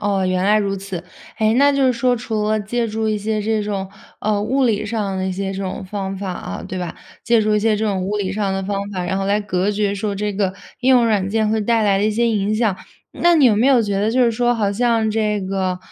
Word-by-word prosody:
哦， 200 -2 0
原 185 0 0
来 210 +2 +4
如 200 -1 -1
此， 190 -2 -6 0.3
哎， 220 -1 +2
那 285 +1 +6
就 275 -1 +1
是 255 - +4
说， 245 +1 +1
除 220 -3 -2
了 215 0 +2
借 230 +3 -2
助 220 +1 -2
一 215 -1 0
些 215 +1 -1
这 215 0 0
种， 200 -2 -3 0.3
呃， 210 -1 0
物 260 +5 +1
理 215 -3 +1
上 205 -4 -2
的 185 - -1
一 - - -1
些 195 +1 -3
这 195 0 -4
种 190 0 -4
方 195 0 -4
法 195 -1 -4
啊， - - -6
对 185 - -5
吧？ 175 -2 -5 0.3
借 235 -1 +3
助 215 0 +1
一 210 - +2
些 220 0 +2
这 220 - -1
种 195 -3 -1
物 200 +3 -2
理 195 -2 -2
上 205 -1 -1
的 195 - -2
方 200 +1 -2
法， 185 -3 -3
然 190 +2 -1
后 195 - -2
来 200 +1 +2
隔 200 -1 -1
绝 205 -1 0
说 205 0 -2
这 205 +1 -2
个 190 -1 -1 0.3
应 260 - +1
用 250 -2 +6
软 205 -4 +1
件 215 +1 +1
会 220 0 +1
带 225 +1 +2
来 200 -2 +3
的 205 - +1
一 215 - +2
些 235 +3 +1
影 210 -2 0
响， 215 -4 +1 0.4
那 345 0 +3
你 295 -4 +4
有 230 - +6
没 220 +5 +2
有 260 -4 +5
觉 200 -2 -1
得 215 +2 +1
就 250 +1 +3
是 230 - +2
说 240 +1 +1
好 205 -3 0
像 225 -1 +1
这 210 -1 0
个， 185 -1 -2
210 Hz, 295 characters per minute, -20 LUFS, 195-225 Hz, 0.4 s, 那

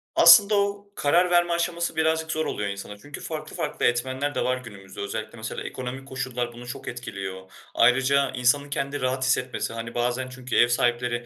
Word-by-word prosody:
Aslında 210 0 +8
o, 200 0 0
karar 175 +5 +3
verme 175 0 +3
aşaması 170 0 -1
birazcık 160 0 +1
zor 155 0 -1
oluyor 105 -1 -2
insanın, 100 +1 -7
çünkü 145 0 -9
farklı 155 -1 -6
farklı - - -2
etmenler 130 +4 0
de - - 0
var 125 0 +1
günümüzde, 100 -7 -10
özellikle 110 +3 -5
mesela, 110 0 -5
ekonomik 130 +1 -6
koşullar 130 -3 -3
bunu 120 +1 -11
çok 125 - -8
etkiliyor. 95 -6 -6 0.2
Ayrıca, 135 +3 +4
insanın 130 +3 +2
kendini 140 0 -3
rahat 130 +1 0
hissetmesi, 130 -2 0
hani, 115 0 -6
bazen 125 +2 -1
çünkü 130 -1 -5
ev 120 - +6
sahipleri 120 0 0
130 Hz, 175 wpm, -25 LUFS, 120-145 Hz, 0.2 s, Aslında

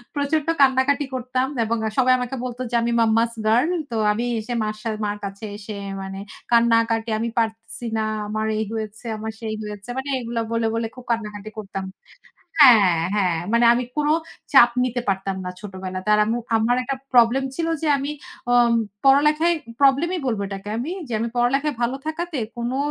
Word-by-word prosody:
প্রচন্ড 290 +2 0
কান্নাকাটি 270 +2 +3
করতাম। 255 +1 -1 0.2
এবং 230 +1 -1
এ - - 0
সবাই 255 0 +5
আমাকে 250 +2 -3
বলত 245 0 -5
যে, - - 0
আমি 235 0 0
মাম্মাস 225 +1 +3 0.2
গার্ল। 245 +9 +3 0.2
তো - - -3 0.2
আমি 230 +3 -1
এসে 235 +3 -5
মার 215 0 -2
সা 230 - -3 0.2
মার 205 0 -2
কাছে 200 +2 -8
এসে 210 0 -8 0.3
মানে 195 0 -6 0.3
কান্নাকাটি, 230 -1 +3
"আমি 230 +1 -1
পারতেসি 225 +1 -2
না। 220 - 0 0.2
আমার 215 +1 -2
এই 220 - -1
হয়েছে, 220 +1 -5
আমার 220 +1 -4
সেই 215 -1 -3
হয়েছে।" 210 +2 -8
মানে 270 +2 -3
এগুলো 235 -1 -3
বলে, 230 0 0
বলে 230 0 -1
খুব 250 - -11
কান্নাকাটি 210 -2 -3
করতাম 195 -2 -5 0.8
হ্যাঁ, 210 - +8 0.2
হ্যাঁ। 180 -5 +1
মানে 235 +1 +4
আমি 245 +1 0
কোনো 300 0 +2 0.4
চাপ 240 -3 +8
নিতে 245 0 -1
পারতাম 195 0 -1
না 180 - -3
ছোটবেলাতে। 190 -1 -6
আর 210 - +3
আম্মু, 230 +3 -1 0.2
আমার 235 +3 +2
একটা 275 +2 -2 0.2
প্রবলেম 245 +2 +5
ছিল 330 - -1 0.2
যে, - - 0
আমি 280 +2 -3 0.4
অম 240 -1 +5 0.3
পড়ালেখায়, 300 +5 +4 0.3
প্রবলেমই 290 +7 +3
বলবো 220 -5 -1
এটাকে 195 +1 -7
আমি 275 +8 -3 0.2
যে, - - -6
আমি 235 - -1
পড়ালেখায় 275 +4 +1
ভালো 250 +3 0
থাকাতে 320 -1 -3 0.2
কোনো 240 +2 -2
235 Hz, 180 wpm, -22 LUFS, 215-260 Hz, 0.8 s, হ্যাঁ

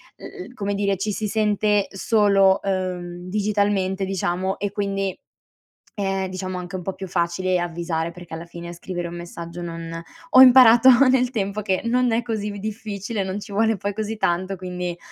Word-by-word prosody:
l - - -18 0.2
l 250 - -15
come 205 -4 -3
dire 200 -1 +1
ci 210 +3 -2
si 210 +1 -2
sente 210 -1 +1
solo, 195 -2 +3
uhm, 180 -2 -3
digitalmente 200 -1 0
diciamo 190 0 -2
e 205 -1 -2
quindi 195 -2 -2 0.8
è, 195 -2 -2
diciamo, 185 0 -5
anche 180 +1 -5
un 180 - -7
po' 195 - -3
più 190 - -7
facile 180 +1 0
avvisare, 170 -1 -3
perché 175 -1 -12
alla 165 +1 -6
fine 170 0 -9
scrivere 175 0 -5
un 175 - -8
messaggio 170 0 -8
non 165 -1 -6 0.3
ho 255 - +8
imparato 250 -1 +8 0.2
nel 255 -1 +2
tempo 205 -2 -2
che 190 -2 0
non 245 +1 +2
è 230 - +2
così 220 -3 -3
v 205 -1 -6
difficile 210 -1 -4
non 190 +2 -4
ci 205 - -10
vuole 220 +2 +2
poi 200 0 -3
così 220 +1 -3
tanto 185 0 -1
quindi 180 -1 -5
195 Hz, 180 wpm, -22 LUFS, 180-210 Hz, 0.8 s, ho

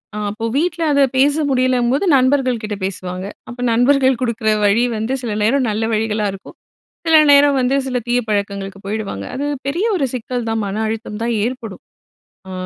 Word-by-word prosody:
அ - - -4
அப்போ 220 +2 -5
வீட்ல 335 +2 -1
அத 280 - +3 0.2
பேச 285 +2 +4 0.2
முடியலம்போது 255 +4 +1
நண்பர்கள்கிட்ட 255 -5 +1
பேசுவாங்க. 185 -1 -5 0.2
அப்ப 245 0 -10
நண்பர்கள் 260 +1 +3
கொடுக்குற 230 -3 -1 0.2
வழி 205 +4 +3
வந்து 220 +4 -2
சில 225 -3 -2
நேரம் 255 +4 +2
நல்ல 215 +1 -1
வழிகளா 215 -1 0
இருக்கும். 195 - -12 0.5
சில 325 -1 +6
நேரம் 285 0 +6
வந்து 255 +2 +1
சில 255 -1 -1
தீய 245 +1 +2
பழக்கங்களுக்கு 200 -1 -3
போயிடுவாங்க. 200 - -4
அது 280 - -2 0.2
பெரிய 340 +9 -1
ஒரு 305 -7 +1
சிக்கல் 245 0 -3
தான். 225 0 -1
மன 195 0 -4
அழுத்தம் 220 -1 -5
தான் 235 0 0
ஏற்படும். 235 -5 -6 0.7
அ - - -7
235 Hz, 165 wpm, -18 LUFS, 210-265 Hz, 0.7 s, சில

